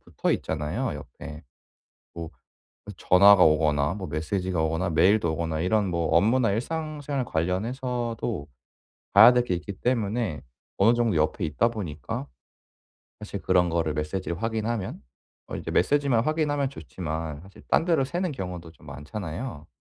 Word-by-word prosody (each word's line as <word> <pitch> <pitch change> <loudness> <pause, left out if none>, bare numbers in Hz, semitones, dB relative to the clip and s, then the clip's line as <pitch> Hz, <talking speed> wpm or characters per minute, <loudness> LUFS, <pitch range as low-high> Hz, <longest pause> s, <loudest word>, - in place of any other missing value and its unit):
붙어 - - -2
있잖아요 75 0 -2
옆에. 75 +5 -10 0.7
뭐 85 -1 -6 0.7
전화가 100 +1 +6
오거나 75 -1 +3
뭐 95 -3 -6
메시지가 90 +2 -2
오거나 80 +3 0
메일도 85 +1 +3
오거나 80 -1 -2
이런 100 +2 +1
뭐 85 -2 0
업무나 115 +5 +3
일상생활 145 +3 -3
관련해서도 115 - -2 0.7
봐야 125 - +10
될 125 0 +3
게 95 - -1
있기 100 +3 -6
때문에 115 - -1 0.4
어느 110 +5 +5
정도 115 -6 +1
옆에 80 +4 0
있다 80 +10 +1
보니까 80 - -5 0.9
사실 - - -6
그런 90 -1 +3
거를 80 -2 0
메시지를 85 +5 -3
확인하면 110 -2 -2 0.5
어 - - -5
이제 - - -5
메시지만 135 +2 +2
확인하면 150 -3 0
좋지만 80 - -5
사실 95 +1 -15
딴 - - +3
데로 160 -6 +3
새는 175 +4 -2
경우도 90 - -6
좀 - - -20
많잖아요? 80 - -6
95 Hz, 325 characters per minute, -26 LUFS, 80-120 Hz, 0.9 s, 봐야